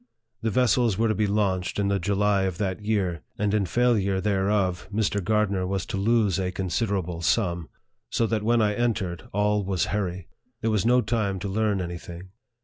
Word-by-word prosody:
The 115 - 0
vessels 120 -3 +2
were 115 0 +2
to - - +3
be 105 -1 0
launched 100 -3 0
in 100 -1 +1
the 100 0 +1
July 100 +1 +1
of 95 -3 -2
that 100 0 -2
year, 95 -7 0 0.2
and 105 0 0
in 100 -3 +1
failure 100 -3 +2
thereof, 95 -2 0
Mr. 105 -1 0
Gardner 100 -3 +1
was 95 -1 -2
to - - -4
lose 105 -2 +2
a 90 -1 -1
considerable 95 -2 -2
sum; 85 -3 0 0.4
so 115 - +1
that 110 -1 0
when 115 +1 +3
I 105 -1 +2
entered, 105 -7 -2
all 105 +1 +1
was 95 -2 0
hurry. 95 -4 -2 0.3
There 115 - +1
was 105 0 +1
no 125 +1 +5
time 110 -4 -1
to 100 - -3
learn 105 0 0
any 85 -1 -4
thing. 85 +2 -10
100 Hz, 190 wpm, -25 LUFS, 95-110 Hz, 0.4 s, no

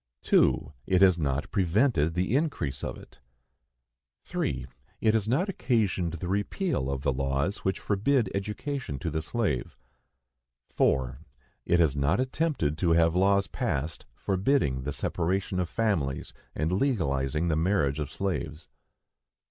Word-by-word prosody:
2. 70 - +3
It 95 0 +4
has 90 -3 +5
not 70 -2 -1
prevented 90 - +2
the 95 +6 +1
increase 140 - -1
of - - -4
it. - - -16 1.0
3. 65 -1 -2 0.3
It 110 -1 +3
has 110 -2 +1
not 140 - +1
occasioned 110 - 0
the 85 +1 -5
repeal 100 - -1
of 70 -1 -3
the 70 -3 +1
laws 70 +8 -1
which 95 - -2
forbid 110 +4 +1
education 105 - -3
to 80 +2 -3
the 80 +1 -1
slave. 90 - -2 1.0
4. 65 -1 +1 0.5
It 85 - +3
has 80 -5 +3
not 70 - +1
attempted 130 - 0
to 85 -2 +3
have 80 0 +4
laws 100 +1 +3
passed 75 -1 -3
forbidding 95 - +1
the 75 - -1
separation 90 +7 -1
of 90 -2 -1
families 85 -10 -1 0.2
and 80 +3 -1
legalizing 80 - 0
the 80 - +2
marriage 80 -4 +1
of 75 -2 -4
slaves. 85 -3 -3
90 Hz, 140 wpm, -28 LUFS, 75-105 Hz, 1.0 s, has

